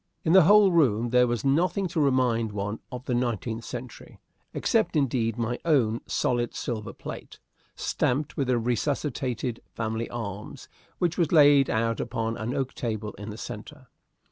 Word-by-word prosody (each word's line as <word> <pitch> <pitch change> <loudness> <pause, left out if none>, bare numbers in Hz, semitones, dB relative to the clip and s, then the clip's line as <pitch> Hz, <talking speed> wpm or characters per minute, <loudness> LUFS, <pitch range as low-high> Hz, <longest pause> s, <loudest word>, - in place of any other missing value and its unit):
In 160 - +3
the 190 -4 +8
whole 205 0 +7
room 120 -8 +2
there 125 0 +5
was 120 -1 -2
nothing 180 +7 +2
to 165 - -2
remind 125 -5 +2
one 105 +1 -3
of 125 0 -7
the 125 - -1
nineteenth 115 -2 -2
century; 125 +1 -9 0.3
except, - - +1
indeed, 120 -6 +1
my 120 +1 -2
own 120 -9 +2
solid 120 -1 0
silver 110 -3 -4
plate, - - -9 0.4
stamped 140 +4 -1
with 140 - -1
the 125 -1 +2
resuscitated 125 0 -2
family 110 0 -3
arms, 105 -3 -6 0.3
which 175 -1 -1
was 165 -3 +2
laid 145 -3 +6
out 115 +1 0
upon 115 -1 -2
an 120 +5 -3
oak 135 -2 -2
table 110 -3 -3
in 105 +1 -7
the 105 - -7
centre. 125 +4 -9
120 Hz, 160 wpm, -26 LUFS, 115-140 Hz, 0.4 s, the